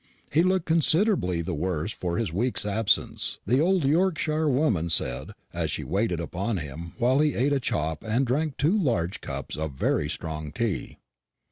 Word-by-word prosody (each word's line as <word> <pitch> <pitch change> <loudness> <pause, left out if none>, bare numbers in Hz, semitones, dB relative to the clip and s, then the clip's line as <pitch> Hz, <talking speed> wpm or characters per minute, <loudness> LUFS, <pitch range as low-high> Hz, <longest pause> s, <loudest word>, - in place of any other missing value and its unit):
He 155 - +4
looked 185 -1 +2
considerably 165 - +2
the 90 - -3
worse 85 +3 -2
for 90 -4 -3
his 115 -8 -1
week's 115 +4 0
absence, 105 +1 +1
the 125 +6 +3
old 180 -2 +2
Yorkshire 155 -1 +2
woman 120 - +1
said, 80 - -1 0.2
as - - -1
she - - -3
waited 95 -3 0
upon 95 +5 -2
him 80 +2 -6
while 125 +4 +3
he 150 -1 +2
ate 135 +4 +2
a 140 - +2
chop 80 - -2
and 115 +5 +1
drank 140 +3 -1
two 160 +8 +3
large 115 - 0
cups - - -5
of 80 -1 -3
very 75 +2 0
strong 80 -2 -5
tea. 115 +2 -2
115 Hz, 170 wpm, -26 LUFS, -, 0.2 s, He